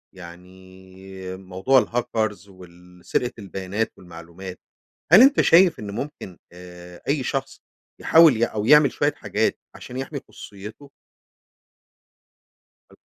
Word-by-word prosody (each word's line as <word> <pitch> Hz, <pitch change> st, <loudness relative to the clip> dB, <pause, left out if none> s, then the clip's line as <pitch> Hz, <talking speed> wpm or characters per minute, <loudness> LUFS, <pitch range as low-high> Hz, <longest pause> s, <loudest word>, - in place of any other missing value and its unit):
يعني 95 Hz, +1 st, -12 dB
موضوع 95 Hz, +8 st, +1 dB
الهاكرز 110 Hz, -4 st, -3 dB
وال 90 Hz, -1 st, -17 dB
سرقة 125 Hz, 0 st, -1 dB
البيانات 100 Hz, +2 st, -4 dB
والمعلومات، 90 Hz, +2 st, -11 dB, 0.5 s
هل 195 Hz, -, +9 dB
أنتَ 275 Hz, +2 st, +5 dB
شايف 175 Hz, +1 st, +5 dB
إن 105 Hz, -1 st, -7 dB
ممكن 105 Hz, -, -7 dB
آآ 90 Hz, 0 st, -13 dB
أي 140 Hz, -1 st, 0 dB
شخص 135 Hz, +2 st, -4 dB, 0.4 s
يحاول 160 Hz, -5 st, +6 dB
ي 115 Hz, -, +2 dB
أو 105 Hz, -2 st, -4 dB
يعمل 150 Hz, 0 st, +6 dB
شوية -, -, 0 dB
حاجات -, -, -1 dB, 0.2 s
عشان 125 Hz, -, -11 dB
يحمِي 135 Hz, +2 st, -5 dB
خصوصيته؟ 105 Hz, +8 st, -12 dB, 2.0 s
حلو. -, -, -20 dB
95 Hz, 115 wpm, -22 LUFS, 90-130 Hz, 2.0 s, هل